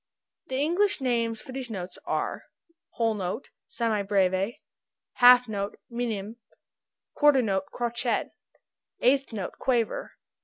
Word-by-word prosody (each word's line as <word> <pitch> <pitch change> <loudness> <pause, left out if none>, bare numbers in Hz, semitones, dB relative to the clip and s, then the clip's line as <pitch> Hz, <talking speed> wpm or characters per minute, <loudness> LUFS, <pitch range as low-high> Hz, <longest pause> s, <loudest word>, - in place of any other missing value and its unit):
The 260 - -4
English 350 +8 +2
names 230 -4 0
for 260 - -10
these 260 -2 -5
notes 185 -4 -6
are: - - -2 0.5
Whole 230 -1 +1
note 200 +4 -4 0.2
semi 225 -3 0
breve. 195 +1 +1 0.6
Half 250 0 +8
note 200 -2 -3
minim. 225 -2 -3 0.8
Quarter 290 -4 +5
note 195 -3 0
crotchet. 240 0 -1 0.7
Eighth 270 +1 +3
note 200 -5 -5
quaver. 240 -4 0
230 Hz, 115 wpm, -27 LUFS, 205-255 Hz, 0.8 s, Half